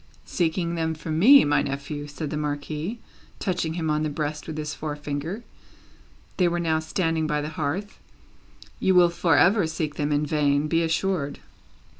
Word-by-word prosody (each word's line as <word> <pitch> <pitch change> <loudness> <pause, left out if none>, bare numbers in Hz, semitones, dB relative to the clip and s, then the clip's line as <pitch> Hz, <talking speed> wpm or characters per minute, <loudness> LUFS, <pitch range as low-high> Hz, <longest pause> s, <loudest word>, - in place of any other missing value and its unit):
"Seeking 170 0 -1
them 160 -1 -1
from 155 0 -3
me, 275 +9 +8
my 145 0 +3
nephew," 145 +2 -4
said 145 +1 -5
the - - -2
Marquis, 150 +6 -3 0.4
touching 170 -4 -2
him 160 -3 -1
on 150 0 +1
the 155 - 0
breast 150 0 -4
with 155 -1 -5
his 150 0 -3
forefinger 150 +6 -4 0.9
they 180 - +4
were 175 0 0
now 160 -2 +1
standing 160 0 -1
by 150 -1 0
the 150 +1 -3
hearth 160 +7 -3 0.8
"you 190 - +2
will 175 -1 +7
for 170 -2 +2
ever 190 -1 +4
seek 155 -2 -3
them 145 0 -1
in 145 +1 +1
vain, 145 -1 +1
be 165 +2 +2
assured." 165 -2 -1
155 Hz, 170 wpm, -25 LUFS, 150-170 Hz, 0.9 s, me